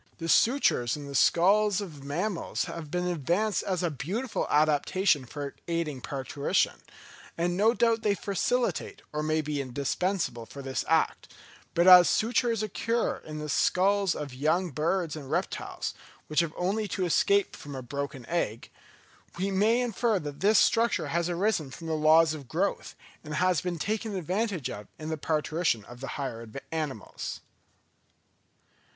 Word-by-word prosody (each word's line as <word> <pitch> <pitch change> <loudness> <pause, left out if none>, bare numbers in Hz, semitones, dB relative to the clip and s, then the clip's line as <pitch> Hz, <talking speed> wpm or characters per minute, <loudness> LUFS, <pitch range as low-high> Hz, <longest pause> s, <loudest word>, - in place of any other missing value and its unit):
The 165 - -5
sutures 165 - +3
in 145 - -8
the 140 - -8
skulls 195 +8 +4
of 180 -8 -6
young 140 - -11
mammals 175 +5 -2
have 160 -3 -7
been 180 +3 -1
advanced 180 +6 0
as 185 -2 -2
a 170 - +1
beautiful 200 - -3
adaptation 150 +1 +2
for 140 +2 -6
aiding 165 -6 -2
parturition, 140 +1 -1 0.6
and 175 +1 0
no 220 +5 +3
doubt 230 -1 +2
they 210 -2 +2
facilitate, 205 +2 -1
or 150 - -1
may 155 +1 +1
be 150 -1 -2
indispensable 135 - -2
for 140 - -9
this 130 -2 -2
act; - - +1 0.4
but 170 - +4
as 180 -1 +9
sutures 230 -1 +1
occur 230 +3 -1
in 155 -1 -9
the 150 0 -5
skulls 195 +4 +2
of 145 -3 -5
young 160 +7 0
birds 160 +3 -1
and 140 -4 -8
reptiles, - - -3 0.3
which 155 -1 0
have 170 -2 0
only 205 +4 0
to 185 -1 -2
escape 200 +3 +2
from 145 -1 -9
a 130 - -6
broken 140 0 -5
egg, 130 -7 -2 0.7
we 195 +2 -1
may 215 +5 +3
infer 235 -2 +1
that 145 -4 -6
this 210 +2 +4
structure 230 +3 +3
has 170 +1 0
arisen 175 -4 0
from 165 +5 -10
the 160 - -2
laws 155 +1 +5
of 145 -4 -8
growth, 185 +8 -2 0.3
and 150 -1 -5
has 180 -1 +2
been 180 -2 -3
taken 215 +4 -2
advantage 185 - -1
of 105 0 -7
in 155 0 -6
the 160 - -1
parturition 155 -6 0
of 120 0 -12
the 135 - -5
higher 115 -5 -5 0.2
animals. 150 -9 -4
165 Hz, 160 wpm, -28 LUFS, 145-200 Hz, 0.7 s, as